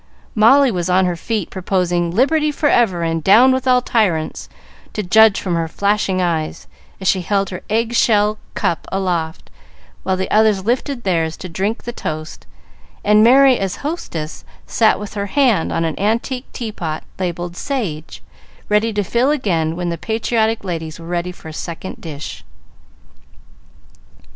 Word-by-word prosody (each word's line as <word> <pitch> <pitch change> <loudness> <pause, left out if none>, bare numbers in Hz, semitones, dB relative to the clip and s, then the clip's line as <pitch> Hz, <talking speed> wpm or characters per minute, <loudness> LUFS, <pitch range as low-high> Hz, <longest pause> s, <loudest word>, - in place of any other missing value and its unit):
Molly 255 +5 +5
was 180 -2 -2
on 185 +1 +3
her 175 -1 0
feet 210 +2 -3
proposing, 180 -2 0
"Liberty 300 - +2
forever, 235 - +2
and 165 -1 -1
down 230 +9 +6
with 260 0 -1
all 250 -1 +4
tyrants," 180 -11 0 0.4
to 210 - -2
judge 220 +3 +5
from 185 - -3
her 165 -1 0
flashing 200 +1 0
eyes 165 -3 -2 0.3
as 190 - -4
she 185 - +3
held 195 +2 0
her 185 - -6
egg 225 +2 0
shell 210 -2 +3 0.2
cup 165 - -1
aloft, 175 -4 -2 0.5
while 190 -1 -1
the 190 - -3
others 215 -3 +3
lifted 245 +2 -1
theirs 165 -4 0
to 185 - -7
drink 195 +6 -2
the 240 - -5
toast, 155 -6 -6 0.6
and 210 +1 +5
Merry, 260 +2 +6
as 195 -2 -2
hostess, 170 - -5 0.2
sat 220 -2 +2
with 210 -1 -7
her 200 -1 -3
hand 235 - +2
on 165 - 0
an 160 - -3
antique 235 +5 -1
teapot, 180 -9 -5 0.2
labelled 175 -1 -3
"Sage," 185 - -4 0.5
ready 210 +2 +2
to 205 0 0
fill 240 +7 +1
again 170 - 0
when 175 0 -3
the 170 - -4
patriotic 225 0 0
ladies 165 -4 -5
were 165 - -10
ready 175 +1 -2
for 175 - -13
a 160 - -8
second 170 +3 -6
"dish." 140 - -7
195 Hz, 160 wpm, -18 LUFS, 170-225 Hz, 0.6 s, down